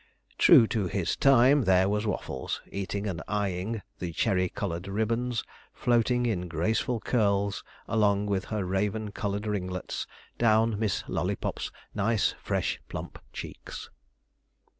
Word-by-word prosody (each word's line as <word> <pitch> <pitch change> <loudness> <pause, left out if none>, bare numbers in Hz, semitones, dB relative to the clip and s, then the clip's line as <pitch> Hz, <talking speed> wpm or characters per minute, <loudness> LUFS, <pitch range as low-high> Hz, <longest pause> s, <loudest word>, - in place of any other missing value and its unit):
True 115 - +8
to 110 -4 -1
his 90 -2 -1
time, 135 0 +5
there 95 0 +4
was 105 +2 0
Waffles, 65 -9 -3
eating 100 +1 -3
and 90 -6 -3
eyeing 100 +1 -2 0.2
the 90 -2 -3
cherry 95 -1 +1
coloured 85 -1 -4
ribbons, 115 +3 0 0.3
floating 120 +1 +2
in 90 -6 -1
graceful 110 - 0
curls 100 -4 +1 0.2
along 105 -2 +2
with 100 -1 -1
her 105 -3 -2
raven 105 +3 -1
coloured 100 0 -3
ringlets, 90 -3 -3 0.3
down 110 -2 +3
Miss 110 -3 0
Lollypop's - - -2 0.2
nice 105 +1 +2
fresh - - -1
plump - - -6
cheeks. - - -8
105 Hz, 125 wpm, -28 LUFS, 95-110 Hz, 0.3 s, True